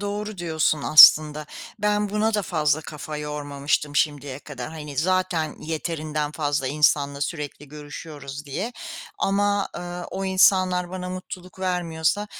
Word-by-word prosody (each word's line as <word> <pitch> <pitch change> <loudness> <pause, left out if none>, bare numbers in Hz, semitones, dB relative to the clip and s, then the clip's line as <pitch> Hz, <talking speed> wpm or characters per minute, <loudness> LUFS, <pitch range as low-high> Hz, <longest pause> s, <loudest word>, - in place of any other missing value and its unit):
doğru 205 0 -4
diyorsun 160 -3 0
aslında. 155 0 +8 0.3
Ben 210 0 +1
buna 215 +2 0
da 210 - +1
fazla 155 -4 +1
kafa 150 0 -7
yormamıştım 145 0 -2
şimdiye 145 -3 0
kadar. 135 -4 -8
Hani, 150 -3 -8
zaten 180 0 0
yeterinden 155 -2 -3
fazla 145 -3 -1
insanla 145 -1 +2
sürekli 150 -1 -5
görüşüyoruz 145 -1 -9
diye 195 - -4 0.5
ama, 200 0 +1
ııı, 175 0 -6
o 195 - -4
insanlar 185 -1 +3
bana 180 0 -5
mutluluk 185 0 -8
vermiyorsa 180 +1 0
160 Hz, 125 wpm, -24 LUFS, 150-185 Hz, 0.5 s, aslında